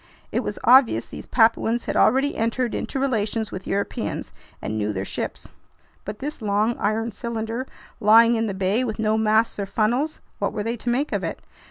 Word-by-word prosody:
It - - 0
was - - -4
obvious 245 - +5
these - - -9
Papuans 230 0 +2
had - - -3
already 270 +3 +3
entered 230 +2 -1
into 270 - -3
relations 220 -4 -1
with 185 0 -7
Europeans 200 +1 -3 0.3
and 110 - -4
knew 105 -1 -1
their 95 0 -3
ships. - - -5 0.5
But 210 +1 -5
this 290 +1 -6
long, 210 +2 +1
iron 225 +2 0
cylinder 230 +2 -4 0.3
lying 230 +3 +6
in 225 -1 0
the 200 - -3
bay, 195 +6 +1
with 220 -4 -3
no 215 -1 +1
masts 220 0 +2
or 200 - -2
funnels—what 240 +9 -1
were 210 - -2
they 230 +2 -2
to 240 +1 -4
make 265 +5 0
of - - -1
it? - - -3
225 Hz, 185 wpm, -23 LUFS, 210-240 Hz, 0.5 s, lying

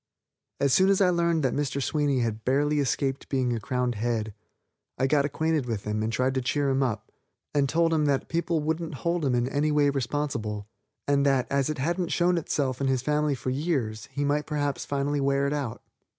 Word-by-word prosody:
As 140 -2 +2
soon 190 +1 +5
as 195 - +4
I 185 -2 +4
learned 170 -2 +1
that 130 - +1
Mr. 145 -1 -1
Sweeney 140 0 +1
had 110 -1 -2
barely 145 +3 +2
escaped 135 0 -1
being 130 -3 +1
a 115 - -2
crowned 125 +2 -1
head, 110 -1 -2 0.6
I 130 - +1
got 140 +1 +3
acquainted 155 -1 0
with 110 -4 -3
him 105 0 -2
and 110 +1 -1
tried 130 +3 +1
to 130 - 0
cheer 140 +3 0
him 135 +1 +1
up, 115 -6 -2 0.4
and 145 -1 +3
I - - -2
told 165 0 +2
him 155 -2 +2
that 140 -2 +1
people 165 -1 0
wouldn't 160 0 -2
hold 170 -1 +1
him 130 -3 +2
in 120 0 +1
any 145 +3 0
way 145 -1 +3
responsible, 120 -6 -2 0.4
and 140 -1 +3
that, 135 -2 +3
as 140 0 +1
it 155 - -2
hadn't 170 +6 -1
shown 175 0 +2
itself 140 -4 -2
in 135 - +1
his 130 -2 +1
family 150 0 +1
for 130 +1 -3
years, 130 -7 -2
he 145 0 -1
might 145 +1 0
perhaps 145 -2 -2
finally 145 0 -1
wear 140 0 +2
it 140 - 0
out. 125 -7 -4
140 Hz, 215 wpm, -27 LUFS, 125-150 Hz, 0.6 s, soon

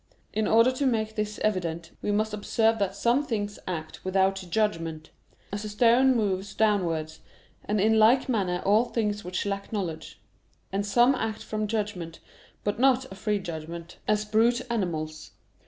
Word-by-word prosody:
In 215 0 0
order 230 +3 +5
to 265 +2 0
make 220 -3 0
this 210 -1 -3
evident, 170 -5 -1
we 205 - -1
must 215 +1 0
observe 220 +2 +1
that 200 -2 -1
some 245 +5 +2
things 205 -6 -3
act 160 -4 -5
without 190 0 +1
judgment; 165 -6 -1 0.4
as 205 +1 -4
a 215 - -5
stone 240 +5 +4
moves 195 -3 -1
downwards; 170 -7 0 0.5
and 210 0 0
in 220 +2 +4
like 235 +5 +5
manner 190 -8 0
all 215 +4 +4
things 210 -3 -2
which 180 +2 -3
lack 200 0 -3
knowledge. 180 -7 -4 0.5
And 200 +1 -1
some 240 +5 +5
act 220 -4 -3
from 215 -1 -2
judgment, 205 -6 -3 0.4
but 205 +2 -1
not 260 -2 +3
a - - -7
free 210 +1 0
judgment; 170 -2 -7
as 210 0 +1
brute 230 +3 +3
animals. 155 -8 -3
210 Hz, 160 wpm, -27 LUFS, 185-220 Hz, 0.5 s, order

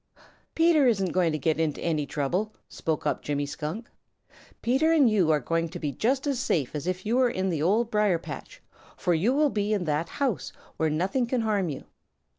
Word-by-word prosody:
"Peter 325 -4 +4
isn't 195 -6 +1
going 180 -3 +2
to 155 - -1
get 155 +2 0
into 155 -3 0
any 155 -4 -1
trouble," 180 +11 -2
spoke 160 -2 -3
up - - 0
Jimmy 145 -1 -2
Skunk. 155 +10 -5 0.8
"Peter 270 +7 +3
and 305 -6 +5
you 200 -7 +3
are 155 -1 +4
going 165 +2 -1
to 175 - -7
be 150 -4 -3
just 260 - 0
as 275 -4 0
safe 155 - 0
as 150 +2 -4
if 185 +1 -2
you 230 +4 +1
were 260 - +4
over - - +3
in 190 -4 -1
the 160 -4 -1
Old 220 +8 +2
Briar 210 -4 +3
patch, - - -9 0.3
for 180 - +1
you 180 +9 +2
will 290 +1 +2
be 210 0 0
in 200 -4 0
that 155 0 -1
old - - -18
house 270 -8 -1 0.3
where 160 - +1
nothing 190 - 0
can 245 0 0
harm 205 -5 0
you. 140 - -6
185 Hz, 220 wpm, -27 LUFS, 160-240 Hz, 0.8 s, and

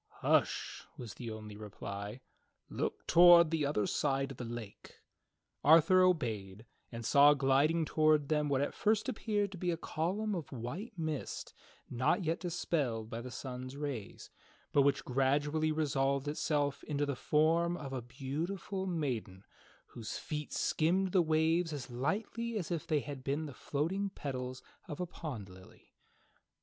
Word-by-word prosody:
"Hush," - - +1
was 115 -4 -7
the 120 - -7
only 110 -1 -7
reply, 105 +2 -7 0.5
"Look - - -3
toward 170 -1 +8
the 155 -3 +1
other 105 -8 0
side 135 -1 0
of 135 - -9
the - - -5
lake." 115 -3 -8 0.7
Arthur 165 +5 +7
obeyed, 110 - 0 0.3
and 115 -1 -6
saw 145 +4 +7
gliding 140 +4 +3
toward 155 -2 +3
them 150 -1 +1
what 135 -1 +2
at 145 - -1
first 215 +2 +1
appeared 210 -5 -1
to 190 - -9
be 180 - -1
a 170 - 0
column 190 +7 -2
of 170 -5 -5
white 140 - -5
mist 155 -4 -4 0.3
not 130 +10 +1
yet 165 +1 0
dispelled 145 -10 -2
by 115 - -4
the 125 - -7
sun's 130 +2 -6
rays, 140 -9 -5 0.4
but 145 - +6
which 140 0 +2
gradually 145 +4 +1
resolved 140 -2 0
itself 145 -1 0
into 145 -1 -1
the 140 -1 -2
form 165 +5 +2
of 140 -4 -7
a 130 - -2
beautiful 165 - -4
maiden 125 - -3 0.4
whose 115 -3 -6
feet 150 -1 -5
skimmed 180 +4 +1
the 185 - +5
waves 160 +1 +2
as 140 -4 -6
lightly 215 - -2
as 180 -5 -4
if 165 -3 -2
they 150 -2 +2
had 140 -2 -7
been 145 +4 -1
the 145 - -7
floating 180 +11 -2
petals 130 -7 -5 0.2
of 150 - -6
a 180 - -1
pond 145 - -6
lily. 95 0 -16
145 Hz, 155 wpm, -33 LUFS, 130-165 Hz, 0.7 s, toward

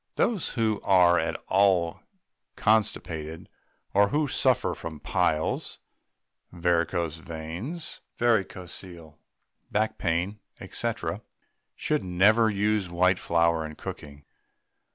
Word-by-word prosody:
Those 215 -8 0
who 110 -3 +1
are 90 -3 +5
at 80 0 -1
all 95 -4 +3 0.6
constipated, 80 -7 0 0.5
or 100 +1 +5
who 150 +4 +1
suffer - - +2
from 80 -2 -7
piles, 80 +2 0 0.7
varicose 85 -2 0
veins, 85 - -5 0.2
varicocele, 90 -7 -2 0.5
back 110 +1 0
pain, 90 +6 -1 0.3
&c., - - +1 0.8
should 150 -1 0
never 105 +5 +4
use 105 -2 0
white 90 +2 +2
flour 85 -1 +2
in 75 -1 -7
cooking. 75 -1 -9
90 Hz, 95 wpm, -27 LUFS, 85-105 Hz, 0.8 s, are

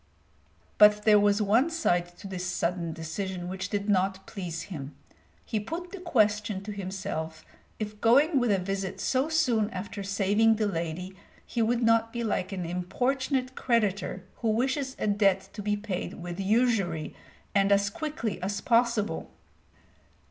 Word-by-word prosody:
But 210 0 +7
there 210 -1 +7
was 205 +1 +3
one 230 +10 +3
side 175 - 0
to 200 - -9
this 185 -2 -5
sudden 170 -1 -1
decision 175 +3 -4
which 190 +1 -4
did 205 -1 -2
not 190 -1 +1
please 175 -5 -5
him. 150 -7 -7 0.5
He 220 - -1
put 335 - -6
the 395 - -7
question 215 - +1
to 210 - -6
himself 185 -5 -5 0.3
if 210 -1 -6
going 275 +6 +5
with 245 -2 +1
a 200 - +4
visit 195 0 -3
so 265 +4 +1
soon 245 -10 +2
after 200 +2 -6
saving 205 +3 +3
the 215 0 0
lady 180 0 -3 0.3
he 235 - -2
would 235 +2 +1
not 230 0 +3
be 235 0 -3
like 200 -3 -1
an 185 -3 -3
importunate 255 - -1
creditor 210 -7 0
who 230 - -1
wishes 260 +4 0
a - - -2
debt 200 -2 +2
to 210 - -6
be 205 0 0
paid 205 -3 -4
with 175 +1 -7
usury 195 -7 +1 0.4
and 195 0 +3
as 200 0 +3
quickly 235 - -4
as 200 +2 -2
possible. 230 -7 +1
205 Hz, 155 wpm, -28 LUFS, 185-230 Hz, 0.5 s, But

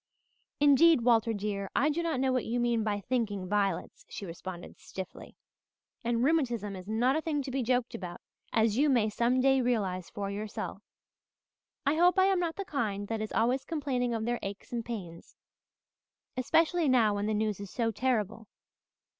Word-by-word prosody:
"Indeed, 290 +1 +6
Walter 230 -1 +3
dear, 200 -2 -3
I 295 +4 +3
do 330 +3 -1
not 330 -6 -1
know 260 0 +2
what 255 - +1
you 240 +2 0
mean 240 -2 +1
by 205 -1 -1
thinking 205 -5 -1
violets," 195 -2 -1
she 200 - -6
responded 175 +1 -8
stiffly, 190 -1 -8 0.7
"and 235 0 +1
rheumatism 240 -9 +1
is 185 0 -9
not 240 +5 +2
a 315 - +1
thing 300 -3 -1
to 265 - -5
be 270 +1 -1
joked 250 0 0
about, 180 -6 -6 0.3
as 220 -1 +2
you 295 +1 +4
may 230 -5 +3
some 240 +4 +2
day 270 0 +4
realize 195 -8 -1
for 200 -1 -4
yourself. 210 +1 -5 1.0
I 285 +3 +2
hope 355 +2 +4
I 375 - +6
am 385 -1 +3
not 340 -2 -1
of - - -46
the 395 - -4
kind 210 - -2
that 225 -1 -2
is 215 - -4
always 250 +4 +1
complaining 270 -6 -1
of 220 -1 -2
their 240 0 -1
aches 195 +1 -7
and 235 -1 -2
pains, 190 -8 -7 1.0
especially 320 +5 +2
now 230 -5 +4
when 205 +1 -1
the 215 - 0
news 210 -2 -1
is 200 -1 -7
so 230 +1 -1
terrible. 225 -2 -1
235 Hz, 185 wpm, -30 LUFS, 205-265 Hz, 1.0 s, Indeed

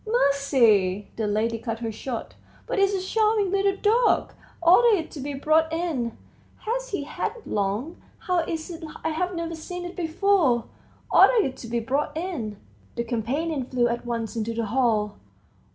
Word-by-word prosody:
"Mercy!" 245 - +3
the 220 -2 -1
lady 225 +2 0
cut 230 -1 -3
her 225 -1 -4
short; 230 +2 -5 0.3
"but - - -1
it's 395 0 +3
a 375 0 -3
charming 430 -3 +2
little 395 0 +2
dog! 455 +4 +2 0.3
order 405 +6 +6
it 320 - -5
to 300 - -8
be 280 +1 -4
brought 310 +3 +2
in. 320 -9 -2 0.4
Has - - -2
he 390 -10 -2
had 295 - -3
it 470 - -14
long? 210 - -2 0.2
How 360 -1 0
is 325 0 -3
it 335 0 -8 0.2
I've 355 +3 -1
never 335 0 -3
seen 355 +2 -6
it 350 - -7
before?... 330 - +2 0.5
Order 475 -4 +6
it 260 - -3
to 235 - -8
be 235 +1 -1
brought 275 +7 -1
in." 295 - -4 0.4
The 235 - -1
companion 260 +6 -2
flew 245 -1 +1
at 235 0 -2
once 230 -2 -3
into 230 0 -2
the 230 0 -1
hall. 215 -3 +1
295 Hz, 170 wpm, -25 LUFS, 230-360 Hz, 0.5 s, order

